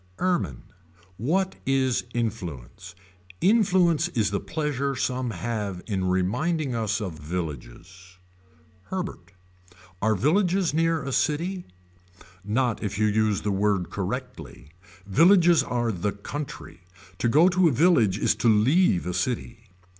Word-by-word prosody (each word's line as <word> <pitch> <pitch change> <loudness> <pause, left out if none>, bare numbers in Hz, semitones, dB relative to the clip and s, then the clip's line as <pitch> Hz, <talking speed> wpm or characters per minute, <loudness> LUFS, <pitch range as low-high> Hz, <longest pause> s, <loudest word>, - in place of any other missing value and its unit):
Ermine. 180 -1 -1 0.5
What 185 - 0
is 130 -2 +1
influence. 90 - -5 0.4
Influence 180 -6 +3
is 115 - -1
the 100 - -1
pleasure 140 -3 -2
some 125 0 -2
have 105 -2 -4
in 95 -4 -2
reminding 125 - 0
us 110 -2 -1
of 90 -8 -6
villages. 90 +3 -7 0.7
Herbert. 185 - -6 0.7
Are 110 +1 +2
villages 180 - +1
near 165 0 +1
a 135 - -4
city. 170 +7 -1 0.8
Not 115 +3 0
if 100 -2 -3
you 110 - +2
use 105 -1 +1
the 105 - 0
word 95 -3 0
correctly. 100 - -6 0.3
Villages 170 - +5
are 120 -3 -1
the 100 +1 -2
country. 135 - -8 0.4
To 120 - +1
go 155 +8 +5
to 185 -1 +3
a - - +3
village 125 - +3
is - - +2
to 120 - +2
leave 110 - +3
a 90 - -3
city. 115 +1 -3
120 Hz, 125 wpm, -25 LUFS, 100-160 Hz, 0.8 s, Villages